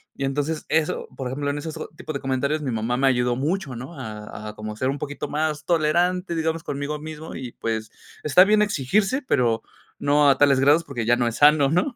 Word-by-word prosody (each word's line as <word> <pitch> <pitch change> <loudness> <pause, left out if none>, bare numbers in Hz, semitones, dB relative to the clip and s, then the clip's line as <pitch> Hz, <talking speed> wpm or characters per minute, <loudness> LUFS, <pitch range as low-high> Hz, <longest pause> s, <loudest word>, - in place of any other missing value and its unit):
y 135 - -2
entonces 145 +3 -2
eso, 160 -1 0
por 130 0 -4
ejemplo, 140 +3 -2
en 145 - -4
esos 160 +1 -6 0.2
tipo 155 - -7
de 140 - -3
comentarios 140 +3 -1
mi 135 - -2
mamá 115 +2 -1
me 135 - +2
ayudó 125 -2 +2
mucho, 150 0 -2
¿no?, 130 +8 -8
a 105 -2 -7
a 105 - -10
como 110 0 -6
ser 130 +4 -1
un 140 - -2
poquito 145 +1 -5
más 150 +1 -2
tolerante, 175 +2 +1
digamos, 160 0 -1
conmigo 145 0 -3
mismo 155 +1 -8
y 125 -2 -6
pues 110 -1 -3 0.3
está 165 +5 +6
bien 210 +1 +4
exigirse, 205 - +1
pero 120 - +1 0.4
no 145 0 +4
a - - 0
tales 140 -2 +5
grados 145 +5 +4
porque 120 -7 -4
ya 120 - +4
no 120 -1 0
es 115 - -2
sano, 145 -1 +5
¿no? 180 - +1
145 Hz, 215 wpm, -23 LUFS, 125-160 Hz, 0.4 s, está